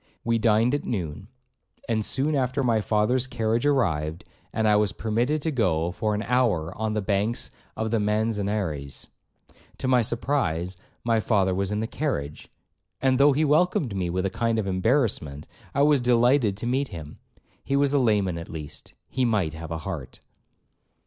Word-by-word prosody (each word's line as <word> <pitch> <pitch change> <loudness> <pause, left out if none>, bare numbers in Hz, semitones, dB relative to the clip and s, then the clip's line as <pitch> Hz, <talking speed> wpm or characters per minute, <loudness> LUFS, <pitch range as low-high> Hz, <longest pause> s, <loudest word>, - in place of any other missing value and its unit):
We 115 0 +1
dined 115 +3 +3
at 145 - 0
noon; 90 -4 -4 0.6
and 110 -2 0
soon 140 +7 0
after 135 0 0
my 115 -3 +2
father's 110 +5 +1
carriage 115 +2 0
arrived, 80 - 0 0.3
and 110 -1 0
I 105 - +5
was 105 -1 +2
permitted 120 +7 0
to 160 - 0
go 90 - +1
for 105 +2 -1
an 105 - -2
hour 110 -9 +1
on 110 0 -2
the 105 - -1
banks 105 +3 -1 0.3
of 110 0 -2
the 115 - +2
Manzanares. 105 -8 -1 0.7
To 130 - -3
my 125 -1 +4
surprise 110 - -1 0.3
my 115 -1 +2
father 100 -4 +2
was 100 +1 -1
in 105 +1 -1
the - - -1
carriage, 110 - -3 0.5
and 130 -1 +2
though 140 +1 +6
he 155 +3 +2
welcomed 150 - +2
me 90 -2 -1
with 95 +2 -1
a 95 - -1
kind 115 +2 0
of 110 - 0
embarrassment, 95 - 0 0.3
I 140 - +4
was 145 -1 +5
delighted 120 -3 +3
to 110 - -4
meet 135 +3 0
him. 80 -8 -9 0.4
He 140 - -1
was 140 0 +2
a 145 - +4
layman 100 -8 +1
at 85 - -9
least,—he 80 - -6
might 100 -9 +1
have 80 0 -7
a 80 - -3
heart. - - -6
110 Hz, 175 wpm, -25 LUFS, 95-125 Hz, 0.7 s, though